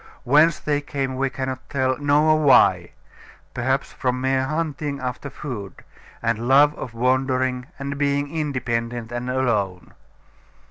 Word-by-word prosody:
Whence 150 +5 +4
they 145 -1 -1
came 135 -2 -3
we 135 +1 0
cannot 130 0 -5
tell, 130 -2 0
nor 150 +2 +3
why; 135 -3 +4 0.6
perhaps 130 +3 -1
from 125 -1 -1
mere 130 0 +1
hunting 150 -2 -3
after 130 +2 -5
food, 105 -11 -7 0.4
and 115 0 -1
love 145 +3 +6
of 120 -5 -8
wandering 130 +1 0
and 140 0 -5
being 145 +1 0
independent 120 -6 -2
and 120 +1 -4
alone. 105 -8 -1
130 Hz, 130 wpm, -22 LUFS, 125-145 Hz, 0.6 s, love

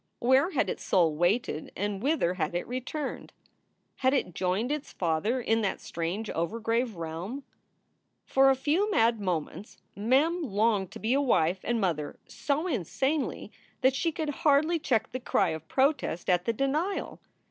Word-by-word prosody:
Where 260 +7 +3
had - - 0
its - - -4
soul 165 -4 +3
waited 175 -1 0
and 200 0 -2
whither 270 - +1
had 170 -2 -2
it 175 - -2
returned? 255 +3 -5 0.6
Had 260 +1 +2
it 180 -9 -1
joined 190 - -1
its 300 -1 -3
father 175 +9 0
in 225 -2 +1
that 200 - -1
strange 175 +7 -4
overgrave 225 +7 -1
realm? 170 - -5 0.8
For 270 0 +4
a 270 - +4
few 315 +10 +1
mad 230 - +3
moments 185 +1 -4 0.2
Mem 275 - +2
longed 210 - +1
to - - -8
be 225 +3 0
a 280 - +3
wife 185 - +2
and 235 0 0
mother 165 -7 -1
so 295 +3 -2
insanely 270 - -1 0.3
that 260 0 +4
she 330 +5 0
could 310 0 -3
hardly 310 +3 +3
check 225 -7 0
the 255 - -4
cry 195 -6 +1
of 160 0 -5
protest 270 - +1
at 180 0 +2
the 230 - +1
denial. 300 - -1
230 Hz, 160 wpm, -28 LUFS, 180-275 Hz, 0.8 s, For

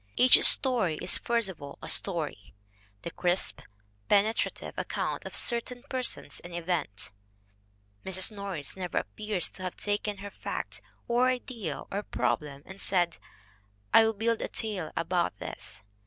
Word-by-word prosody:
Each 255 0 +7
story 225 - +6
is 180 - +1
first 235 -3 +1
of 185 -6 -8
all 140 0 -8
a - - -8
story, 160 - 0 0.5
the 170 - -5
crisp, 180 +2 +1 0.5
pene 205 +2 +4
trative - - -3
account - - -2
of - - -7
certain 245 +1 0
persons 255 -2 -1
and 175 0 -9
events. 165 - -2 0.9
Mrs. 190 +2 +3
Norris 195 -8 -3
never 180 -2 -4
appears 210 -4 -1
to - - -11
have 185 -1 -4
taken 205 0 -1
her 200 +1 -8
fact - - -5 0.3
or 245 +2 +3
idea 235 - -4
or 200 - -1
problem 140 - -2
and 190 +1 -9
said, 175 -3 +1 0.7
"I 225 - +9
will 225 0 +2
build 225 +2 0
a - - -1
tale 200 -8 -4
about 170 - 0
this." 95 - -6
190 Hz, 150 wpm, -29 LUFS, 170-220 Hz, 0.9 s, I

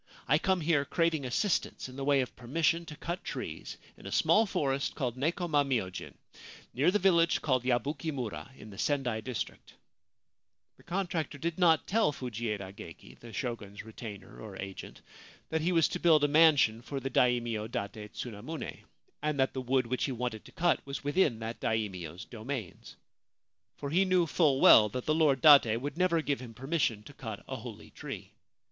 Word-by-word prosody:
I 150 +3 +4
come 190 0 +1
here 155 -3 +2
craving 165 -2 0
assistance 170 - -1
in 130 - -11
the 135 - -5
way 140 -1 +3
of 125 - -5
permission 165 +6 0
to 150 - -8
cut 170 +4 -5
trees - - -6 0.2
in - - -12
a - - -6
small 220 +1 +4
forest 140 -6 -1
called 125 -5 -2
Nekoma 155 +1 +1
myojin, 110 -10 -3 0.6
near 135 +8 +3
the 200 - +3
village 170 -4 +3
called 130 -4 +1
Yabuki 130 +5 -1
mura, 110 - -5
in 105 - -11
the 100 - -11
Sendai 125 -6 0
district/ 115 -6 -6 1.0
The - - -20
contractor 175 -4 -2
did 165 +3 -3
not 165 -3 +4
tell 220 -5 +2
Fujieda 110 -7 -4
Geki, 80 - -12
the 115 - -11
Shogun's 110 -5 -5
retainer 105 -2 -9
or 105 -3 -9
agent, 95 0 -8 0.5
that 160 0 0
he 170 +3 +1
was 165 -2 +4
to - - -3
build 160 -4 +5
a - - +5
mansion 145 -7 +5
for 135 +3 -5
the 135 0 -4
Daimio 120 -3 +1
Date 105 -1 -5
Tsunamune, 120 +7 -6 0.4
and 150 -2 -1
that 130 - +2
the 130 - -3
wood 130 0 +1
which 125 +2 -1
he 135 - -2
wanted 120 -3 -3
to - - -13
cut 175 0 +1
was 140 +1 -6
within 145 -4 +2
that 115 +1 -6
Daimio's 95 -5 -3
domains. 115 -3 -7 0.8
For 140 - -5
he 185 +4 +3
knew 185 -2 +3
full 150 -4 +2
well 105 -1 +8
that 125 +4 -5
the 155 - +2
Lord 150 -5 +3
Date 140 -7 +7
would 145 +5 -4
never 170 -3 +2
give 145 -2 -1
him 120 -3 -10
permission 130 -6 -1
to 145 - -13
cut 110 -6 -7
a - - -4
holy - - -10
tree. - - -8
135 Hz, 180 wpm, -30 LUFS, 115-160 Hz, 1.0 s, well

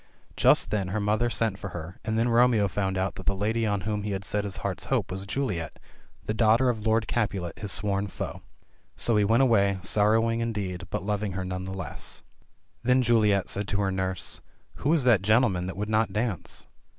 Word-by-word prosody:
Just - - +4
then 100 -3 0
her 100 +4 -2
mother 105 +3 +1
sent 110 -4 -1
for - - -5
her, 90 0 -8
and 110 0 -1
then 115 +2 +2
Romeo 115 -3 +4
found 95 0 -1
out 95 +1 0
that 95 - -9
the 100 - +2
lady 110 +3 0
on 100 -2 0
whom 105 +1 -2
he 105 0 -3
had 95 +1 -4
set 105 -1 -1
his 100 - -5
heart's - - -2
hopes - - 0
was 95 +1 -5
Juliet, 100 - -2 0.5
the 110 - -1
daughter 115 +3 +4
of 110 -2 -2
Lord 110 0 +2
Capulet, 100 -7 -2
his 105 -2 -4
sworn 100 -1 -1
foe. - - -6 0.5
So 115 - +2
he 105 - +4
went 115 +6 +4
away, 100 -6 +3
sorrowing 110 +3 +2
indeed, 100 -6 -3
but - - -3
lov 105 0 -1
ing 105 -3 -2
her 95 0 -3
none 90 0 -4
the 95 - -5
less. 95 -7 -5 0.6
Then 125 +1 +3
Juliet 105 -5 +3
said 100 0 -2
to 100 0 0
her 95 -1 +1
nurse. 95 -1 -3 0.4
"Who 145 - 0
is 160 -5 +3
that 120 -6 +5
gentleman 105 -4 +2
that 95 - -6
would 105 +1 -2
not 110 +1 +1
dance 105 -3 -2
105 Hz, 210 wpm, -27 LUFS, 95-115 Hz, 0.6 s, that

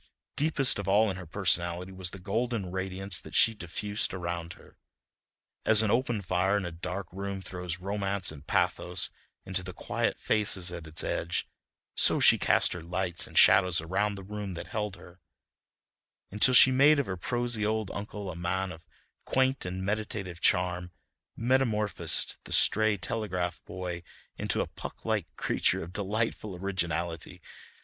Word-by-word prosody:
Deepest 145 -6 +2
of 100 - -5
all 105 +2 +4
in - - -5
her 90 -2 -8
personality 85 0 0
was 95 -1 -5
the 100 - -9
golden 105 0 -2
radiance 95 0 -3
that - - -10
she 115 - +5
diffused 105 +1 -2
around 85 -1 -4
her. - - -18 0.9
As 110 0 +4
an 105 - +1
open 120 -3 0
fire 95 +3 +1
in 100 - -2
a 85 - -4
dark 90 +4 -5
room 100 +1 -4
throws 90 -3 -5
romance 100 0 -1
and 75 -1 -12
pathos 90 0 +1 0.3
into 95 0 -2
the 90 0 -8
quiet - - -1
faces 95 -4 +2
at 85 -2 -7
its 80 0 -3
edge, 85 +1 -1 0.5
so - - +3
she - - +7
cast - - +3
her 90 - -6
lights 85 +1 -2
and - - -8
shadows 90 -2 +6
around 95 +5 0
the 95 - -8
rooms 100 -1 -5
that - - -6
held 105 -3 -3
her, 90 0 -15 1.1
until 105 +6 +5
she 130 - +10
made 140 +4 +6
of 140 - +1
her 95 - -3
prosy 120 +4 0
old 110 -1 -1
uncle 100 -1 -5
a - - -8
man 90 +2 -2
of 80 -1 -11 0.4
quaint 130 -2 +1
and 95 +1 -4
meditative 100 -4 -3
charm, 90 0 +2 0.5
metamorphosed 115 -4 0
the - - -11
stray 110 -1 +3
telegraph 90 -4 -3
boy 90 -2 -5 0.3
into - - -1
a - - 0
Puck - - -9
like - - 0
creature - - +1
of 85 +2 -10
delightful 105 0 -2
originality. 85 -3 -3
95 Hz, 160 wpm, -29 LUFS, 90-105 Hz, 1.1 s, she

